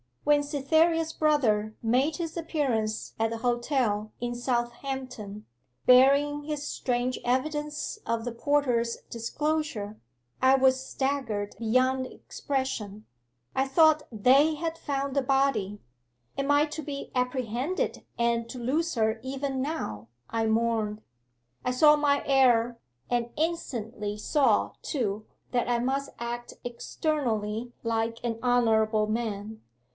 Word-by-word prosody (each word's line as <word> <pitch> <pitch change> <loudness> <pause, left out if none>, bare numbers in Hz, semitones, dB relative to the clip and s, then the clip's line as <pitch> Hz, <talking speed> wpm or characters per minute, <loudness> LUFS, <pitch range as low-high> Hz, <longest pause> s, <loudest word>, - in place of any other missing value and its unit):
'When 295 -1 +4
Cytherea's 320 +3 +2
brother 220 -9 +2
made 260 +7 +2
his 335 -1 -4
appearance 260 -10 -1
at 225 0 +2
the 230 - -3
hotel 240 -3 0
in 240 0 -2
Southampton, 240 -3 -3 0.4
bearing 280 +3 +5
his 295 -1 -4
strange 245 0 -1
evidence 295 - -1
of 230 -1 -1
the 245 - -3
porter's 235 -2 +1
disclosure, 235 -3 -2 0.4
I 260 +1 +6
was 265 0 +3
staggered 265 -7 -2
beyond 255 +3 +2
expression. 220 -9 -4 0.5
I 265 +1 +2
thought 310 +2 +5
they 270 +8 +4
had 325 +1 -3
found 275 -2 -2
the 275 - +3
body. 265 -7 +1 0.6
"Am 275 +1 -1
I 290 +1 +5
to 310 +1 -5
be 285 -1 -6
apprehended 250 - -1
and 235 0 +1
to 250 - -7
lose 305 +7 0
her 220 -1 +1
even 270 0 -3
now?" 115 - -4 0.2
I 225 -1 0
mourned. 220 -1 0 0.6
I 250 - +2
saw 300 +4 +6
my 290 -1 +2
error, 245 -4 +3 0.3
and 240 -1 0
instantly 235 -10 -3
saw, 280 +6 +2
too, 215 -7 -2 0.3
that 245 -1 0
I 240 - +3
must 270 +3 -1
act 240 0 -5
externally 240 -3 -2
like 230 0 -1
an 230 -2 -2
honourable 220 -3 +3
man. 215 -1 -3
250 Hz, 120 wpm, -28 LUFS, 225-285 Hz, 0.6 s, I